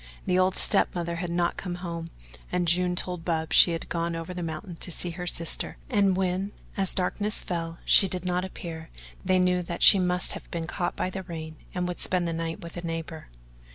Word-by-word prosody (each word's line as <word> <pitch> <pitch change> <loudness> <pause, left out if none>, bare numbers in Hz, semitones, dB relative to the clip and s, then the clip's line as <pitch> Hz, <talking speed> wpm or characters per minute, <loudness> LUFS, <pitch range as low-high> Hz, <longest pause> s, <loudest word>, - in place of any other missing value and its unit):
The 185 -2 +2
old 185 0 +3
step - - +2
mother 170 -1 -2
had 175 0 -3
not 170 0 0
come 180 -2 -4
home, 170 -2 -5 0.4
and 180 -1 0
June 180 +1 +2
told 180 -1 -3
Bub 160 -2 -1
she - - +8
had 165 -1 -3
gone 170 0 -1
over 165 +2 -5
the 180 - -5
mountain 165 +1 -5
to - - -5
see 175 +1 +1
her 180 +1 -6
sister, 165 -1 0
and 200 -4 +3
when, 190 +2 -1 0.2
as 195 -2 +2
darkness 205 +3 0
fell, 165 -2 -3
she 195 - +7
did 180 -1 -4
not 180 0 0
appear 165 -3 -7 0.3
they 185 -1 +3
knew 180 0 +3
that 170 0 -3
she 200 - +10
must 180 0 +1
have - - -8
been 165 -1 -3
caught 175 +1 -2
by 185 - -2
the 190 - -4
rain 160 -3 -7 0.2
and 180 0 0
would 180 - -4
spend 180 -2 +2
the 165 - -2
night 165 0 -3
with 170 0 -9
a - - -4
neighbour. 165 -1 -5
175 Hz, 220 wpm, -27 LUFS, 165-180 Hz, 0.4 s, she